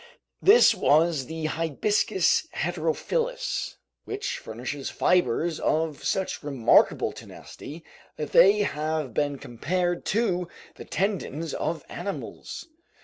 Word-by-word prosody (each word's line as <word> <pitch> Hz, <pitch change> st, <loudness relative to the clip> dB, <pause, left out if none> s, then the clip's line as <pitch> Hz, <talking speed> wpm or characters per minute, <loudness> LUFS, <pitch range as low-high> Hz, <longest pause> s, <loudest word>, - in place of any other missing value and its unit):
This 430 Hz, +5 st, +7 dB
was 155 Hz, -3 st, +2 dB
the 160 Hz, -1 st, -5 dB
"hibiscus 165 Hz, -, +1 dB
heterophyllus," 480 Hz, -, -2 dB, 0.3 s
which 410 Hz, 0 st, -4 dB
furnishes 125 Hz, +5 st, -5 dB
fibers 170 Hz, -1 st, +1 dB
of 155 Hz, -2 st, -1 dB
such 190 Hz, -1 st, -1 dB
remarkable 140 Hz, -6 st, +3 dB
tenacity 160 Hz, +3 st, -11 dB, 0.3 s
that 150 Hz, -, -5 dB
they 205 Hz, +2 st, +6 dB
have 150 Hz, -, -2 dB
been 145 Hz, +1 st, 0 dB
compared 175 Hz, +9 st, -2 dB
to 185 Hz, -5 st, 0 dB, 0.3 s
the -, -, -11 dB
tendons 175 Hz, -5 st, -2 dB
of 160 Hz, -3 st, -3 dB
animals. 200 Hz, -, -6 dB
165 Hz, 100 wpm, -26 LUFS, 150-195 Hz, 0.3 s, This